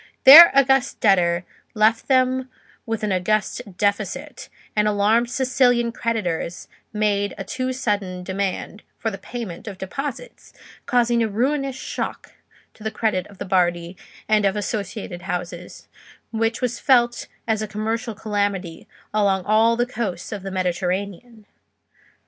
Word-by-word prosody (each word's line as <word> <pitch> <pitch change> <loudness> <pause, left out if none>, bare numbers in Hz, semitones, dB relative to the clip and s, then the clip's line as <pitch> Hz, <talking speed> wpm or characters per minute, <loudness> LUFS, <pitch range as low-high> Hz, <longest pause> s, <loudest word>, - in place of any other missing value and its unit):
Their 320 +6 +12
august 270 -1 +3
debtor 175 -4 +3 0.3
left 220 +1 +2
them 260 -1 +2 0.4
with 225 -1 -3
an 210 - 0
august 190 +5 0 0.2
deficit, 210 +7 -2 0.3
and 210 0 +2
alarmed 210 +3 +2
Sicilian 245 -2 +2
creditors 185 -8 -3 0.2
made 205 -1 0
a 195 - -5
too 255 +6 -3
sudden 205 -8 -2
demand 195 +2 -3 0.2
for 225 - -2
the 195 - -7
payment 215 -4 -7
of 200 -3 -6
deposits, 275 - -7 0.3
causing 240 -1 +2
a 225 - +2
ruinous 270 +5 -1
shock - - -5 0.4
to 215 - -15
the 220 - -1
credit 215 -4 -1
of 200 - -16
the - - -6
Bardi 175 -2 0 0.3
and 215 -1 +3
of 195 0 +2
associated 205 -3 -4
houses, 180 0 -6 0.4
which 225 +1 -1
was 245 -1 -2
felt 240 -3 +2 0.2
as 220 -1 0
a 215 - -3
commercial 220 +1 -3
calamity 200 -5 -3 0.3
along 195 -3 +1
all 225 +2 +3
the 240 - +2
coasts 220 -8 -4
of 205 -3 -5
the 195 - -6
Mediterranean. 190 +5 -3
215 Hz, 135 wpm, -22 LUFS, 195-240 Hz, 0.4 s, Their